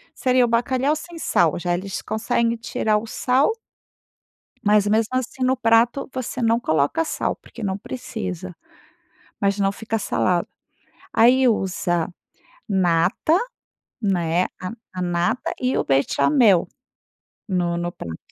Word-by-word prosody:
Seria 255 Hz, -1 st, +3 dB
o -, -, -1 dB
bacalhau 255 Hz, +5 st, +1 dB
sem 335 Hz, +2 st, -9 dB
sal 170 Hz, -, +2 dB
já, 175 Hz, 0 st, -1 dB
eles 190 Hz, +2 st, -4 dB
conseguem 230 Hz, +1 st, 0 dB
tirar 220 Hz, -1 st, 0 dB
o 210 Hz, -, -4 dB
sal. 255 Hz, -, +2 dB, 1.1 s
Mas, 210 Hz, 0 st, +4 dB
mesmo 220 Hz, +1 st, +2 dB
assim, 255 Hz, +1 st, -3 dB
no 260 Hz, +1 st, +2 dB
prato 235 Hz, +2 st, +2 dB
você 255 Hz, 0 st, -4 dB
não 230 Hz, +1 st, +3 dB
coloca 160 Hz, -, +1 dB
sal -, -, -2 dB
porque 235 Hz, -, -13 dB
não 190 Hz, -1 st, -1 dB
precisa. 90 Hz, -, -6 dB, 0.9 s
Mas 200 Hz, 0 st, +2 dB
não 195 Hz, -1 st, +2 dB
fica 225 Hz, +2 st, -3 dB
salgado. 180 Hz, -3 st, 0 dB, 0.7 s
Aí 255 Hz, +3 st, +5 dB
usa, 180 Hz, -6 st, 0 dB, 0.6 s
nata, 185 Hz, -, +2 dB, 0.7 s
né, 175 Hz, -3 st, +1 dB, 0.2 s
a 185 Hz, -, -4 dB, 0.2 s
a 185 Hz, -, -3 dB
nata 175 Hz, +5 st, 0 dB
e 255 Hz, +1 st, 0 dB
o -, -, 0 dB
bechamel 190 Hz, -, +3 dB, 0.8 s
no 175 Hz, -2 st, 0 dB
no 175 Hz, 0 st, -2 dB
prato. 80 Hz, -, -7 dB
210 Hz, 130 wpm, -22 LUFS, 175-245 Hz, 1.1 s, Aí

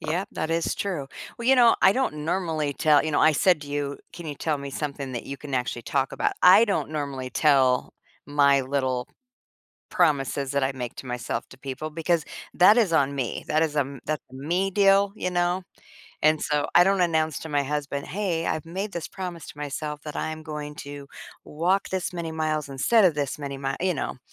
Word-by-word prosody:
Yep, 175 Hz, +6 st, -2 dB
that 160 Hz, -, -3 dB
is 165 Hz, 0 st, 0 dB
true. 175 Hz, -9 st, -3 dB, 0.3 s
Well, 235 Hz, -, -5 dB
you 265 Hz, -, +7 dB
know, 240 Hz, -3 st, +6 dB
I 190 Hz, -, +6 dB
don't 150 Hz, -, -1 dB
normally 160 Hz, -4 st, -1 dB
tell 150 Hz, 0 st, +3 dB
you 155 Hz, -, -2 dB
know, -, -, +2 dB
I 155 Hz, -, +6 dB
said 175 Hz, +1 st, +3 dB
to 145 Hz, -, -9 dB
you, 145 Hz, -1 st, -3 dB
"Can 170 Hz, -1 st, -9 dB
you 150 Hz, -, -4 dB
tell 150 Hz, +1 st, -1 dB
me 140 Hz, 0 st, -6 dB
something 140 Hz, -2 st, -4 dB
that 120 Hz, -, -5 dB
you 140 Hz, -, -5 dB
can 140 Hz, 0 st, -6 dB
actually 125 Hz, -1 st, -2 dB
talk 135 Hz, +2 st, 0 dB
about?" -, -, 0 dB
I 185 Hz, +5 st, +8 dB
don't 200 Hz, -7 st, -1 dB
normally 140 Hz, -4 st, -4 dB
tell 135 Hz, -4 st, +3 dB, 0.3 s
my 140 Hz, -2 st, +4 dB
little 130 Hz, -2 st, -1 dB, 0.8 s
promises 140 Hz, -2 st, +1 dB
that 140 Hz, -1 st, +1 dB
I 135 Hz, -, 0 dB
make 125 Hz, -3 st, -6 dB
to -, -, -8 dB
myself 125 Hz, -1 st, -4 dB
to 130 Hz, -, -14 dB
people 135 Hz, +3 st, -5 dB
because 165 Hz, +1 st, 0 dB, 0.3 s
that 195 Hz, +5 st, +7 dB
is 220 Hz, -8 st, +3 dB
on 140 Hz, -3 st, +2 dB
me. 130 Hz, -4 st, -3 dB
That 155 Hz, +1 st, +2 dB
is 150 Hz, -2 st, -1 dB
a -, -, +4 dB
m 140 Hz, -1 st, -4 dB
that's 155 Hz, 0 st, -2 dB
a -, -, -11 dB
me 175 Hz, +8 st, -1 dB
deal. 200 Hz, 0 st, +4 dB
You 185 Hz, -, -3 dB
know? 175 Hz, +1 st, 0 dB, 0.6 s
And 155 Hz, 0 st, +3 dB
so, 150 Hz, -2 st, 0 dB
I 175 Hz, -, +8 dB
don't 195 Hz, 0 st, +2 dB
announce 160 Hz, -3 st, +1 dB
to 160 Hz, -, -7 dB
my 145 Hz, -1 st, +1 dB
husband, 140 Hz, 0 st, -3 dB
"Hey, 180 Hz, -4 st, -1 dB
I've 155 Hz, -1 st, -2 dB
made 195 Hz, +5 st, -4 dB
this 170 Hz, -2 st, -5 dB
promise 180 Hz, -4 st, -6 dB
to -, -, -11 dB
myself 150 Hz, +1 st, -4 dB
that 150 Hz, -2 st, -7 dB
I -, -, -2 dB
am 155 Hz, 0 st, -7 dB
going 150 Hz, -1 st, -6 dB
to 145 Hz, 0 st, -8 dB, 0.4 s
walk 180 Hz, +6 st, 0 dB
this 185 Hz, -1 st, -2 dB
many 170 Hz, -2 st, -4 dB
miles 155 Hz, -2 st, -1 dB
instead 190 Hz, -, +4 dB
of 170 Hz, -, +2 dB
this 145 Hz, -2 st, -2 dB
many 140 Hz, -2 st, -5 dB
mi", 135 Hz, 0 st, -3 dB
you 180 Hz, 0 st, +1 dB
know. 135 Hz, -, -4 dB
150 Hz, 215 wpm, -25 LUFS, 140-175 Hz, 0.8 s, I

